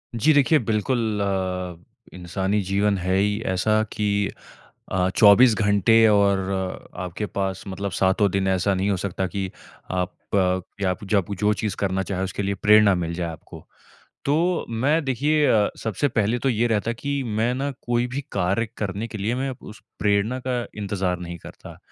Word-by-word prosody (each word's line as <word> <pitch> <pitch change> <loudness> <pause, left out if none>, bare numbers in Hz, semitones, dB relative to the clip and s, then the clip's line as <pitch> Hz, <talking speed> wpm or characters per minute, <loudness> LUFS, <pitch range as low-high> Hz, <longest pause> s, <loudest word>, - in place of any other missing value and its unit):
जी 150 +8 +4
देखिए, 145 +2 +4
बिल्कुल 110 -1 -1
अ, 95 -2 -2 0.4
इंसानी 95 +3 -2
जीवन 100 +1 +1
है 95 +1 -1
ही 105 +2 +1
ऐसा 110 +4 +2
कि 100 -1 0 0.6
अ, 95 0 +1
24 110 +3 +7
घंटे 110 +2 +4
और 100 -2 +4 0.6
आपके 90 +3 -4
पास 95 -2 -3
मतलब 100 +1 -4
सातों 95 +3 +2
दिन 95 0 0
ऐसा 95 +1 +1
नहीं 95 +2 0
हो 100 - +1
सकता 95 0 -2
कि 95 +1 -3 0.4
आप 90 0 -1 0.2
अ, 95 -1 +2 0.2
यब 90 -1 +1
जब 100 -1 +1
जो 105 0 +3
चीज़ 105 -3 -3
करना 95 -1 0
चाहें 95 -1 -3
उसके 95 +2 -3
लिए 100 0 -1
प्रेरणा 105 -2 +6
मिल 85 -1 -3
जाए 85 0 -3
आपको। 80 - -12 0.6
तो 165 +5 +1
मैं 140 +8 +1
देखिए 145 +4 +2
अ, 105 -2 +3
सबसे 110 +5 0
पहले 115 -2 0
तो 135 - 0
ये 120 -1 +1
रहता 110 -1 0
है - - -6
कि, 140 -1 -2
मैं 115 +1 0
ना 140 +2 -2
कोई 120 0 0
भी 130 +3 -4
कार्य 100 +4 0
करने 105 +2 -3
के 110 -1 -7
लिए 105 +4 -1
मैं 135 +1 -2
उस 105 - -11 0.2
प्रेरणा 105 +4 +1
का 125 -2 -1
इंतज़ार 95 -3 -2
नहीं 85 -1 -6
करता। - - -12
100 Hz, 175 wpm, -23 LUFS, 95-115 Hz, 0.6 s, 24